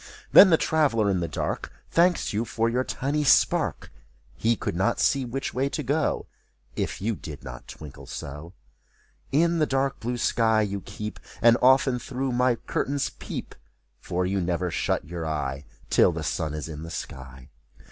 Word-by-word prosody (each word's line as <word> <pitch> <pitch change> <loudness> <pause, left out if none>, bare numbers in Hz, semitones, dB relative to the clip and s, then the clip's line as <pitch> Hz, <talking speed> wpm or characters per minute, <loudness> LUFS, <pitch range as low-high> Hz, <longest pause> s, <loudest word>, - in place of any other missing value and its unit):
Then 195 - +10
the 165 - +5
traveler 125 -12 +2
in 95 - +1
the 85 - -1
dark. 75 - -3 0.2
Thanks 175 -5 +3
you 105 +3 0
for 115 -1 -1
your 125 +2 +1
tiny 145 +4 -1
spark! 145 - +2 0.4
He 115 +1 +1
could 85 - -3
not 100 +7 +1
see 135 -2 +2
which 135 +3 -4
way 135 +2 0
to 150 - -3
go, 145 +4 0 0.5
If - - -3
you 110 +2 0
did 75 -6 -9
not 60 -1 -9
twinkle 75 -4 -10
so. 75 +5 -7 0.8
In 170 +4 +3
the 155 - +2
dark 135 0 0
blue 120 +2 -3
sky 110 -1 +2
you 100 -1 -3
keep, 105 +3 -7 0.2
And 115 0 +6
often 130 0 +4
through 130 +2 -3
my 125 0 +2
curtains 140 +4 -2
peep. - - -7 0.5
For 90 +1 -2
you 95 +1 0
never 90 0 -1
shut - - -1
your 85 0 -5
eye 70 -2 -3 0.3
Till - - +5
the - - -4
sun 75 -1 -2
is 75 - -5
in 75 -2 -7
the 80 - -7
sky. 65 -4 -8
115 Hz, 175 wpm, -26 LUFS, 85-135 Hz, 0.8 s, Then